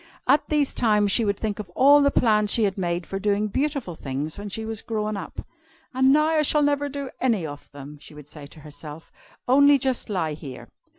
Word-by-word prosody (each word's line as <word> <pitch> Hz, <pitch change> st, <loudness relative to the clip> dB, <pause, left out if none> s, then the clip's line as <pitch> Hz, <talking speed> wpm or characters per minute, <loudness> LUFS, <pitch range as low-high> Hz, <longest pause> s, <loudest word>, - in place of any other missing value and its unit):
At 290 Hz, -, +3 dB
these 295 Hz, -2 st, +1 dB
times 210 Hz, -3 st, +2 dB
she 230 Hz, -, +3 dB
would 200 Hz, -2 st, -1 dB
think 215 Hz, -1 st, -4 dB
of 205 Hz, -4 st, -7 dB
all 285 Hz, +2 st, +6 dB
the 280 Hz, -, +4 dB
plans 215 Hz, -6 st, +2 dB
she 230 Hz, -, +2 dB
had 195 Hz, -2 st, 0 dB
made 175 Hz, -2 st, -2 dB
for 195 Hz, -, -5 dB
doing 205 Hz, +1 st, 0 dB
beautiful 275 Hz, -, -2 dB
things 145 Hz, +1 st, -5 dB
when 205 Hz, 0 st, -7 dB
she 220 Hz, +3 st, -5 dB
was 220 Hz, -1 st, -5 dB
grown 215 Hz, -1 st, -3 dB
up. 200 Hz, -, -7 dB, 0.5 s
"And 260 Hz, +1 st, +3 dB
now 305 Hz, +2 st, +4 dB
I 320 Hz, -1 st, +2 dB
shall 300 Hz, 0 st, +2 dB
never 285 Hz, 0 st, 0 dB
do 280 Hz, -1 st, -6 dB
any 225 Hz, -9 st, +1 dB
of 145 Hz, -1 st, -10 dB
them," 145 Hz, +1 st, -11 dB
she 150 Hz, -, -14 dB
would 150 Hz, -1 st, -13 dB
say 150 Hz, -1 st, -11 dB
to 155 Hz, -, -16 dB
herself, 150 Hz, +1 st, -11 dB, 0.4 s
"only 285 Hz, +3 st, +5 dB
just 260 Hz, -3 st, -2 dB
lie 170 Hz, -6 st, -2 dB
here. 145 Hz, -3 st, -10 dB
210 Hz, 220 wpm, -24 LUFS, 165-270 Hz, 0.5 s, all